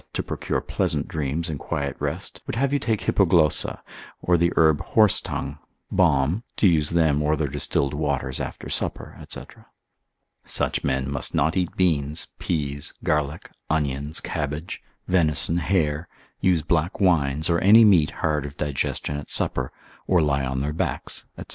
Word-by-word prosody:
6. -, -, -34 dB
to -, -, -2 dB
procure -, -, -3 dB
pleasant -, -, -1 dB
dreams 75 Hz, +2 st, -2 dB
and 75 Hz, -3 st, -4 dB
quiet 70 Hz, -1 st, -3 dB
rest, -, -, -4 dB
would -, -, -3 dB
have 135 Hz, +3 st, 0 dB
you 145 Hz, -, +2 dB
take 110 Hz, -5 st, -1 dB
hippoglossa, 85 Hz, -6 st, +3 dB, 0.4 s
or 90 Hz, -, +2 dB
the 85 Hz, 0 st, +2 dB
herb 80 Hz, -2 st, +4 dB
horsetongue, 85 Hz, -9 st, +1 dB, 0.3 s
balm, 85 Hz, -, +2 dB
to 105 Hz, -, +4 dB
use 80 Hz, -4 st, +2 dB
them 80 Hz, -4 st, +2 dB
or 75 Hz, +1 st, +2 dB
their 75 Hz, -, 0 dB
distilled 70 Hz, 0 st, 0 dB
waters 70 Hz, -4 st, -1 dB
after -, -, -6 dB
supper, -, -, -2 dB
&c. -, -, -4 dB, 1.0 s
Such -, -, 0 dB
men 65 Hz, -1 st, 0 dB
must 70 Hz, -2 st, -1 dB
not 80 Hz, +4 st, +2 dB
eat 90 Hz, -3 st, -1 dB
beans, 80 Hz, -4 st, +1 dB
peas, 70 Hz, -4 st, -3 dB
garlic, 75 Hz, -1 st, -1 dB, 0.2 s
onions, 75 Hz, -1 st, -1 dB
cabbage, 75 Hz, +2 st, -4 dB, 0.3 s
venison, 85 Hz, -2 st, +3 dB
hare, 85 Hz, -2 st, 0 dB, 0.3 s
use 90 Hz, -5 st, +2 dB
black 85 Hz, +3 st, 0 dB
wines, 80 Hz, -6 st, +2 dB
or 85 Hz, -1 st, +2 dB
any 110 Hz, +4 st, +7 dB
meat 90 Hz, -8 st, +5 dB
hard 75 Hz, -3 st, -1 dB
of 70 Hz, -, -12 dB
digestion 70 Hz, 0 st, -2 dB
at 75 Hz, -, -8 dB
supper, 65 Hz, -2 st, 0 dB, 0.4 s
or 90 Hz, -, +4 dB
lie 70 Hz, -3 st, +1 dB
on 65 Hz, 0 st, -2 dB
their 75 Hz, +2 st, -2 dB
backs, 80 Hz, -, -2 dB
&c. -, -, -6 dB
75 Hz, 160 wpm, -24 LUFS, 70-85 Hz, 1.0 s, any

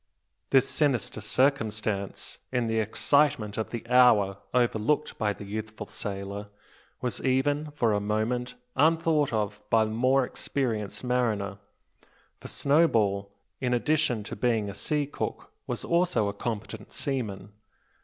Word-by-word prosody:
This 135 Hz, -1 st, +5 dB
sinister 130 Hz, -8 st, 0 dB
circumstance, 110 Hz, -5 st, -1 dB
in 125 Hz, -2 st, +1 dB
the 110 Hz, 0 st, 0 dB
excitement 115 Hz, 0 st, +2 dB
of 110 Hz, -, -2 dB
the 115 Hz, -1 st, -6 dB
hour 115 Hz, -6 st, +5 dB
overlooked 120 Hz, +4 st, +1 dB
by 105 Hz, -1 st, +1 dB
the 100 Hz, 0 st, -7 dB
youthful 105 Hz, +1 st, -5 dB
sailor, 100 Hz, 0 st, -5 dB, 0.5 s
was 125 Hz, -2 st, -2 dB
even, 145 Hz, +3 st, +1 dB
for 115 Hz, -6 st, +2 dB
a 105 Hz, -, +2 dB
moment, 110 Hz, +4 st, -1 dB, 0.2 s
unthought 160 Hz, -2 st, +3 dB
of 105 Hz, -1 st, -2 dB
by 110 Hz, 0 st, +4 dB
the 110 Hz, -, -4 dB
more 130 Hz, +4 st, +3 dB
experienced 115 Hz, -7 st, -3 dB
mariner, 110 Hz, -6 st, 0 dB, 0.8 s
for -, -, -9 dB
Snowball, 110 Hz, -10 st, +2 dB, 0.3 s
in 125 Hz, -2 st, +1 dB
addition 130 Hz, -4 st, +1 dB
to -, -, -6 dB
being 110 Hz, -5 st, 0 dB
a -, -, -9 dB
sea 145 Hz, +9 st, 0 dB
cook, 140 Hz, -, -5 dB, 0.2 s
was -, -, -3 dB
also 170 Hz, -, +2 dB
a 100 Hz, -, -2 dB
competent 110 Hz, 0 st, -5 dB
seaman. 110 Hz, -8 st, -3 dB
115 Hz, 135 wpm, -28 LUFS, 105-135 Hz, 0.8 s, This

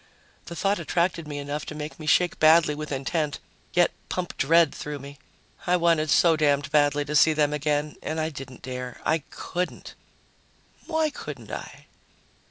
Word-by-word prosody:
The 170 Hz, -, -7 dB
thought 195 Hz, +2 st, +1 dB
attracted 170 Hz, 0 st, 0 dB
me 145 Hz, -1 st, -5 dB
enough 145 Hz, +1 st, -4 dB
to 155 Hz, -, -6 dB
make 150 Hz, +1 st, -7 dB
me 155 Hz, -, -8 dB
shake 175 Hz, +2 st, +3 dB
badly 155 Hz, -1 st, +6 dB
with 150 Hz, 0 st, -6 dB
intent, 145 Hz, +2 st, -1 dB, 0.4 s
yet 175 Hz, 0 st, +4 dB, 0.2 s
pump 180 Hz, -1 st, -3 dB
dread 165 Hz, +1 st, +4 dB
through 150 Hz, 0 st, -5 dB
me. 140 Hz, +1 st, -11 dB, 0.5 s
I 180 Hz, 0 st, +4 dB
wanted 165 Hz, -3 st, +2 dB
so 165 Hz, +2 st, +5 dB
damned 145 Hz, -2 st, +1 dB
badly 145 Hz, -1 st, +3 dB
to 150 Hz, +1 st, -3 dB
see 155 Hz, +2 st, +6 dB
them 150 Hz, -1 st, +1 dB
again 150 Hz, 0 st, -1 dB
and 160 Hz, +1 st, -3 dB
I 160 Hz, 0 st, 0 dB
didn't 135 Hz, -3 st, -10 dB
dare. 125 Hz, -1 st, -6 dB
I 160 Hz, +1 st, +2 dB
couldn't.... 180 Hz, +1 st, -5 dB, 0.9 s
Why 320 Hz, -2 st, +1 dB
couldn't -, -, -8 dB
I? -, -, -8 dB
155 Hz, 170 wpm, -25 LUFS, 145-170 Hz, 0.9 s, badly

